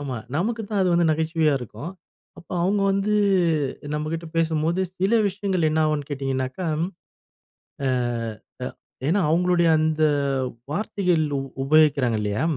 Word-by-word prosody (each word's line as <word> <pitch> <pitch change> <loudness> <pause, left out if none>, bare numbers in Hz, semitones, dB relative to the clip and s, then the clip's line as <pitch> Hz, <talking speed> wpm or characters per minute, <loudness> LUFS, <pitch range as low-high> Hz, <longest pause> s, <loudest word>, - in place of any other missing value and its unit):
ஆமா. 135 -3 -4 0.2
நமக்கு 220 +7 -1
தான் 205 -2 +1
அது 185 - +2
வந்து 170 0 +3
நகைச்சுவையா 160 -1 +1
இருக்கும். 125 - -7 0.5
அப்போ - - -12
அவங்க 200 +3 +2
வந்து 200 +2 +1 0.8
நம்மகிட்ட 155 +2 -3
பேசும்போது 165 +2 +1 0.2
சில 190 +4 +1 0.2
விஷயங்கள் 190 -3 -1
என்ன 160 +1 +1
ஆகும்னு 150 -2 -1
கேட்டீங்கன்னாக்கா, 135 +3 -2 1.2
அ 120 -3 -3 0.4
ஏன்னா 195 +6 +3
அவங்களுடைய 175 0 +3
அந்த 155 0 +1 0.7
வார்த்தைகள் 180 -2 0 0.2
உ - - -1 0.2
உபயோகிக்றாங்க 140 -6 +4
இல்லையா, 105 +3 -1
160 Hz, 120 wpm, -24 LUFS, 140-180 Hz, 1.2 s, உபயோகிக்றாங்க